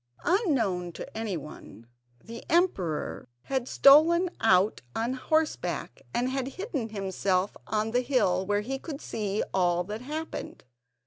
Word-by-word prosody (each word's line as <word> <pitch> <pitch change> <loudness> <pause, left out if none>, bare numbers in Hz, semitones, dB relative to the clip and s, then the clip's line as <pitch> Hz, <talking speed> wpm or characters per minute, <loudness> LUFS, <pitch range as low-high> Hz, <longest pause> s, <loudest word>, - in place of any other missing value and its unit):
Unknown 250 - +1
to - - -9
anyone, 165 - -6 0.4
the 230 +1 -9
emperor 190 - 0
had 260 -2 -2
stolen 330 +7 +6
out 200 -1 +3
on 235 +3 0
horseback, 310 +4 -1
and 240 +1 0
had 265 -1 -2
hidden 315 - -3
himself 195 -2 -1
on 215 +1 0
the 245 +2 +2
hill, 240 -8 +2
where 205 +1 0
he 270 +5 -4
could 290 -2 -7
see 210 -6 -2
all 175 -2 +2
that 210 +5 -6
happened. 310 +5 -6
225 Hz, 130 wpm, -28 LUFS, 190-280 Hz, 0.4 s, stolen